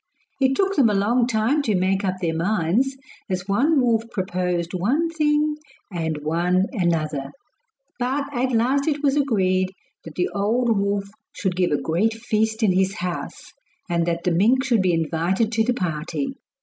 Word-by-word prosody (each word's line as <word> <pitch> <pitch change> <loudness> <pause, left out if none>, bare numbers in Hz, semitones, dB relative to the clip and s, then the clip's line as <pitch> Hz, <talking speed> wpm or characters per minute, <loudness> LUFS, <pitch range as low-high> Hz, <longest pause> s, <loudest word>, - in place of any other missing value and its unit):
It 265 0 +3
took 390 +3 +1
them 260 -6 +4
a 210 - +1
long 235 +5 +2
time 235 +5 +1
to 220 -7 0
make 190 +2 +1
up 185 -1 0
their 170 -3 -1
minds, 205 +9 0 0.3
as 185 0 -3
one 275 +10 +3
wolf 230 -2 +1
proposed 180 -3 -2
one 265 - 0
thing 300 -1 +1 0.4
and 160 -3 -2
one 175 +4 +1
another; 160 - -1 0.7
but 260 +4 0
at 260 0 0
last 255 +5 +1
it 295 -1 -1
was 275 -1 +3
agreed 190 -9 +1 0.3
that 160 - -10
the 180 - 0
old 225 +4 +1
wolf 200 0 0 0.3
should 190 -3 -2
give 180 -1 +1
a 145 - +1
great 205 +8 0
feast 220 0 -1
in 205 - +4
his 190 +2 +1
house, 180 -3 -5 0.3
and 170 -2 0
that 170 0 -1
the 180 - +1
mink 225 +10 +3
should 240 -6 +2
be 185 -1 +2
invited 170 +7 0
to 225 -1 +2
the 245 +2 0
party. 180 - -3
200 Hz, 175 wpm, -23 LUFS, 180-250 Hz, 0.7 s, them